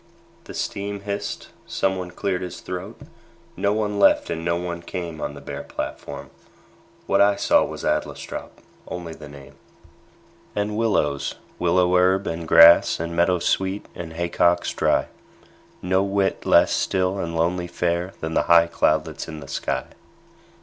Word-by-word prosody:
The -, -, -9 dB
steam 100 Hz, 0 st, -4 dB
hissed. 100 Hz, 0 st, -5 dB, 0.2 s
Someone 95 Hz, -2 st, -1 dB
cleared 90 Hz, +1 st, -2 dB
his 90 Hz, -1 st, -6 dB
throat. 90 Hz, +5 st, -6 dB, 0.6 s
No 100 Hz, +2 st, +1 dB
one 105 Hz, -1 st, -1 dB
left -, -, +4 dB
and 80 Hz, -, -3 dB
no 85 Hz, 0 st, +1 dB
one 85 Hz, 0 st, -4 dB
came 85 Hz, -2 st, -6 dB
On -, -, -4 dB
the -, -, -10 dB
bare -, -, -6 dB
platform. 70 Hz, -2 st, -6 dB, 0.7 s
What -, -, +3 dB
I 100 Hz, 0 st, +5 dB
saw -, -, +3 dB
Was -, -, -6 dB
Adlestrop -, -, -3 dB, 0.4 s
only 85 Hz, -2 st, -6 dB
the 75 Hz, -2 st, -11 dB
name 70 Hz, -2 st, -13 dB, 1.0 s
And 105 Hz, +1 st, -1 dB
willows, 100 Hz, -11 st, 0 dB, 0.2 s
willow 90 Hz, +1 st, +3 dB
herb, 95 Hz, +2 st, +3 dB
and 80 Hz, 0 st, -4 dB
grass, 85 Hz, +1 st, +7 dB
And 85 Hz, +1 st, -4 dB
meadowsweet, 95 Hz, +3 st, +1 dB
and 80 Hz, -2 st, -7 dB
haycocks 85 Hz, +1 st, +1 dB
dry; -, -, +2 dB, 0.8 s
No 95 Hz, +1 st, +2 dB
whit 100 Hz, 0 st, -1 dB
less -, -, +5 dB
still 95 Hz, +1 st, 0 dB
and 85 Hz, -2 st, -3 dB
lonely 85 Hz, +2 st, 0 dB
fair 85 Hz, +1 st, -1 dB
Than 80 Hz, 0 st, -3 dB
the -, -, 0 dB
high 85 Hz, -1 st, +7 dB
cloudlets 85 Hz, -, 0 dB
in 80 Hz, -1 st, -7 dB
the 70 Hz, -, -10 dB
sky. 70 Hz, -, -2 dB
90 Hz, 150 wpm, -23 LUFS, 85-95 Hz, 1.0 s, grass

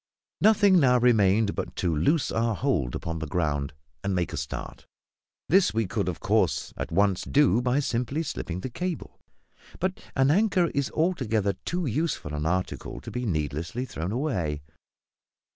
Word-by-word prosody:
Nothing 205 Hz, -3 st, +5 dB
now 125 Hz, -4 st, +5 dB
remained 110 Hz, -4 st, +3 dB
but -, -, -5 dB
to 85 Hz, -3 st, 0 dB
loose 135 Hz, -, +2 dB
our 115 Hz, -1 st, 0 dB
hold 90 Hz, -, 0 dB
upon 80 Hz, 0 st, -4 dB
the 80 Hz, -, -4 dB
ground, 70 Hz, -3 st, -1 dB, 0.3 s
and 100 Hz, -1 st, 0 dB
make 90 Hz, -2 st, -1 dB
a -, -, -3 dB
start. 75 Hz, -, -6 dB, 0.6 s
This 185 Hz, -, +4 dB
we 115 Hz, -1 st, +2 dB
could, -, -, -1 dB
of -, -, -5 dB
course, -, -, +1 dB
at -, -, -5 dB
once 100 Hz, +1 st, +2 dB
do 140 Hz, -5 st, +3 dB
by 125 Hz, +2 st, +1 dB
simply 130 Hz, +4 st, -1 dB
slipping 95 Hz, -, -4 dB
the 130 Hz, -, -5 dB
cable; 180 Hz, +3 st, -5 dB, 0.6 s
but 185 Hz, +1 st, -1 dB, 0.2 s
an 135 Hz, +1 st, +4 dB
anchor 190 Hz, -2 st, +3 dB
is 140 Hz, -2 st, 0 dB
altogether 115 Hz, -, 0 dB
too 175 Hz, 0 st, -1 dB
useful 140 Hz, -, -2 dB
an 75 Hz, +1 st, -2 dB
article 90 Hz, +2 st, -2 dB
to -, -, -9 dB
be 125 Hz, -1 st, -3 dB
needlessly 80 Hz, -, -2 dB
thrown 90 Hz, -6 st, -4 dB
away. 90 Hz, -, -2 dB
115 Hz, 160 wpm, -26 LUFS, 85-145 Hz, 0.6 s, Nothing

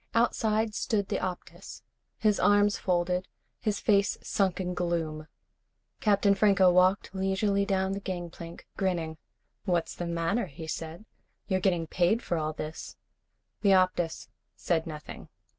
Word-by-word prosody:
Outside 220 Hz, -2 st, +2 dB
stood 205 Hz, -2 st, -1 dB
the -, -, 0 dB
Optus, 185 Hz, -1 st, -6 dB, 0.3 s
his 210 Hz, -2 st, +2 dB
arms 205 Hz, 0 st, +4 dB
folded, 180 Hz, 0 st, 0 dB, 0.3 s
his 210 Hz, -2 st, -1 dB
face 200 Hz, -1 st, +2 dB
sunk 195 Hz, -3 st, 0 dB
in 180 Hz, -1 st, -2 dB
gloom. 165 Hz, -3 st, -2 dB, 0.7 s
Captain 200 Hz, -1 st, +3 dB
Franco 195 Hz, -2 st, +5 dB
walked 185 Hz, +2 st, +3 dB
leisurely 195 Hz, +1 st, +1 dB
down 190 Hz, -1 st, +1 dB
the 195 Hz, -, -2 dB
gangplank, 175 Hz, -3 st, -7 dB
grinning. 170 Hz, -4 st, -1 dB, 0.5 s
"What's 175 Hz, -4 st, 0 dB
the 175 Hz, -, -4 dB
matter?" 170 Hz, +6 st, 0 dB
he 160 Hz, +2 st, -9 dB
said. 165 Hz, +4 st, -6 dB, 0.4 s
"You're 190 Hz, -2 st, +1 dB
getting 180 Hz, -3 st, +1 dB
paid 185 Hz, +8 st, +1 dB
for 170 Hz, -, -1 dB
all 155 Hz, 0 st, -1 dB
this." 155 Hz, +1 st, -7 dB, 0.7 s
The 200 Hz, -2 st, +5 dB
Optus 185 Hz, -3 st, +1 dB, 0.3 s
said 165 Hz, -2 st, -1 dB
nothing. 150 Hz, -2 st, -8 dB
185 Hz, 135 wpm, -29 LUFS, 170-200 Hz, 0.7 s, Franco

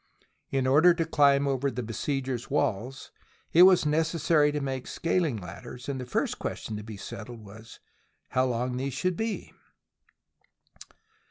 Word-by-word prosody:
In 135 Hz, -1 st, 0 dB
order 155 Hz, +7 st, +5 dB
to 165 Hz, -1 st, 0 dB
climb 140 Hz, -3 st, +3 dB
over 135 Hz, 0 st, 0 dB
the 125 Hz, -1 st, -4 dB
besiegers' 130 Hz, +2 st, -3 dB
walls, 120 Hz, +7 st, -2 dB, 0.4 s
it 170 Hz, -, +7 dB
was 185 Hz, -3 st, +7 dB
necessary 155 Hz, -1 st, +2 dB
to 150 Hz, -, -2 dB
make 135 Hz, -2 st, -4 dB
scaling 165 Hz, -7 st, 0 dB
ladders, 120 Hz, +7 st, -9 dB
and 135 Hz, -2 st, -3 dB
the 125 Hz, -, -7 dB
first -, -, -1 dB
question 110 Hz, -, -4 dB
to 105 Hz, -, -7 dB
be 110 Hz, -1 st, -8 dB
settled 110 Hz, +2 st, -9 dB
was 110 Hz, +3 st, -13 dB, 0.5 s
how 130 Hz, 0 st, +2 dB
long 125 Hz, 0 st, -1 dB
these 135 Hz, 0 st, -3 dB
should 180 Hz, +7 st, 0 dB
be. 220 Hz, +3 st, -4 dB
135 Hz, 150 wpm, -28 LUFS, 120-150 Hz, 0.5 s, it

